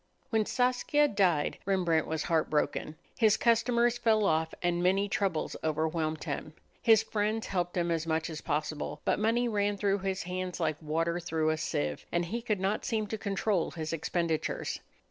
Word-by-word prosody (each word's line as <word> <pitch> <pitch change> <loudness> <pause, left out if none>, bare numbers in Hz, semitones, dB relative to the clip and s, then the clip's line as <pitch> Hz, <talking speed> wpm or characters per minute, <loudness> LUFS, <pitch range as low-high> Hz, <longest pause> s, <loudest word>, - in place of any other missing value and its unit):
When 220 -2 +2
Saskia 255 +4 +2
died 185 - +1
Rembrandt 175 -5 +1
was 160 -1 -2
heartbroken. 155 -2 0 0.2
His 215 -3 +5
customers 235 +1 +3
fell 220 -3 +3
off 160 -2 +1
and 175 0 +1
many 190 +3 +2
troubles 195 -5 -1
overwhelmed 155 0 -1
him. 155 - -4 0.3
His 225 -2 +5
friends 215 +1 -1
helped 175 -2 -2
him 170 -1 +1
as 165 -1 -1
much 160 0 0
as 155 -2 -6
possible, 150 0 -2
but - - +2
money 230 +3 +2
ran 205 -2 0
through 200 0 +1
his 190 0 -2
hands 180 +1 -4
like 155 -3 -1
water 165 +3 0
through 160 -2 0
a 155 - -1
sieve, 75 - -2
and 175 0 +1
he 230 +7 -3
could 215 -4 -1
not 195 +3 0
seem 220 -4 -1
to 220 - -2
control 200 -2 0
his 160 -1 -5
expenditures. 165 0 -1
180 Hz, 170 wpm, -30 LUFS, 160-215 Hz, 0.3 s, His